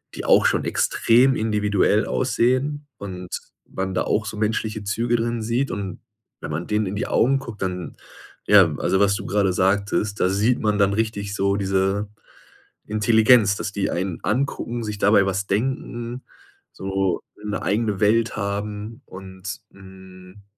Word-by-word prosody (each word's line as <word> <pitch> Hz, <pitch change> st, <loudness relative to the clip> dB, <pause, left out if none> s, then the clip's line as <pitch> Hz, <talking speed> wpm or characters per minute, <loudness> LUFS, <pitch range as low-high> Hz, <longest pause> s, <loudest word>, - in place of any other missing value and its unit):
die -, -, -6 dB
auch -, -, +5 dB
schon -, -, +2 dB
extrem 125 Hz, +3 st, +3 dB
individuell 105 Hz, -1 st, +1 dB
aussehen 130 Hz, +4 st, 0 dB
und 90 Hz, -3 st, -7 dB, 0.4 s
man 95 Hz, 0 st, -4 dB
da -, -, 0 dB
auch 110 Hz, -, 0 dB
so 105 Hz, 0 st, -6 dB
menschliche 110 Hz, 0 st, -1 dB
Züge 115 Hz, +4 st, 0 dB
drin 115 Hz, 0 st, -2 dB
sieht. 120 Hz, +5 st, -1 dB
Und 100 Hz, -3 st, -5 dB, 0.4 s
wenn -, -, -6 dB
man 80 Hz, +3 st, -4 dB
denen 105 Hz, 0 st, 0 dB
in 95 Hz, +1 st, -4 dB
die 120 Hz, +5 st, -2 dB
Augen 135 Hz, +3 st, +2 dB
guckt, 115 Hz, -6 st, -9 dB
dann 90 Hz, -2 st, -4 dB, 0.5 s
ja, 95 Hz, -7 st, +6 dB
also 95 Hz, -, +1 dB
was 100 Hz, 0 st, +3 dB
du -, -, -6 dB
gerade 100 Hz, -2 st, +1 dB
sagtest, 100 Hz, +2 st, 0 dB
da 90 Hz, -, +3 dB
sieht 105 Hz, +6 st, +1 dB
man 105 Hz, -1 st, +1 dB
dann 100 Hz, -1 st, +3 dB
richtig 100 Hz, -2 st, -2 dB
so 100 Hz, 0 st, +1 dB
diese 95 Hz, +1 st, 0 dB, 0.8 s
Intelligenz, 110 Hz, 0 st, +4 dB
dass 105 Hz, -, -4 dB
die 100 Hz, -1 st, -1 dB
einen 90 Hz, -1 st, -3 dB
angucken, 120 Hz, +1 st, -1 dB
sich 105 Hz, -2 st, -5 dB
dabei 100 Hz, -1 st, +4 dB
was 95 Hz, +1 st, -2 dB
denken, 120 Hz, +2 st, -2 dB, 0.5 s
so 95 Hz, -1 st, -2 dB, 0.2 s
'ne 105 Hz, 0 st, -3 dB
eigene 105 Hz, -1 st, 0 dB
Welt 110 Hz, +2 st, +2 dB
haben 105 Hz, +3 st, -4 dB
und, 95 Hz, +1 st, -8 dB
hm, 95 Hz, 0 st, -15 dB
105 Hz, 155 wpm, -22 LUFS, 95-115 Hz, 0.8 s, ja